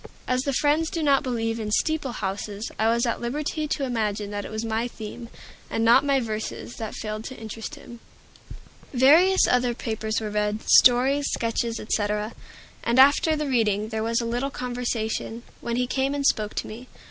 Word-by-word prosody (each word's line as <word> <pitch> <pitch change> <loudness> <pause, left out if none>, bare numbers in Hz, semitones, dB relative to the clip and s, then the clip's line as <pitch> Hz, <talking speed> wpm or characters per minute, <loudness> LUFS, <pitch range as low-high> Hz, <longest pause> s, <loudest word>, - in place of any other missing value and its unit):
As 255 0 +1
the 280 - -1
Friends 300 +4 +2
do 330 - -3
not 280 -2 +4
believe 230 -3 -2
in 215 -1 -3
"steeple 290 +3 0
houses," 200 +1 -4
I 220 +1 +3
was 235 +2 +2
at 235 - -2
liberty 300 +5 -2
to 290 - -2
imagine 215 -5 -2
that 205 -1 -4
it - - -7
was 220 +1 -4
my 225 +1 -1
theme, 230 +1 -8 0.4
and 225 - 0
not 235 +4 +6
my 280 -1 +2
verses, 220 0 -5
that 220 -2 -5
failed 215 0 -5
to 260 - -7
interest 225 +5 -7
him. 240 -5 -12 1.0
Various 325 +10 +6
other 245 -1 +2
papers 220 -2 -2
were 215 -2 -4
read, 210 +1 -1
stories, 265 +3 +5
sketches, 230 0 -1
etc., 210 0 -1 0.5
and 235 +1 +1
after 285 +4 +6
the 300 0 -2
reading 215 -5 +1
there 220 -1 -3
was 230 +1 0
a - - -3
little 245 +4 -1
conversation, 240 -3 -3 0.2
when 235 0 -3
he 250 +1 +1
came 270 +2 -1
and 280 -1 -2
spoke 215 -5 +1
to - - -3
me. 240 +4 -9
235 Hz, 185 wpm, -25 LUFS, 220-265 Hz, 1.0 s, not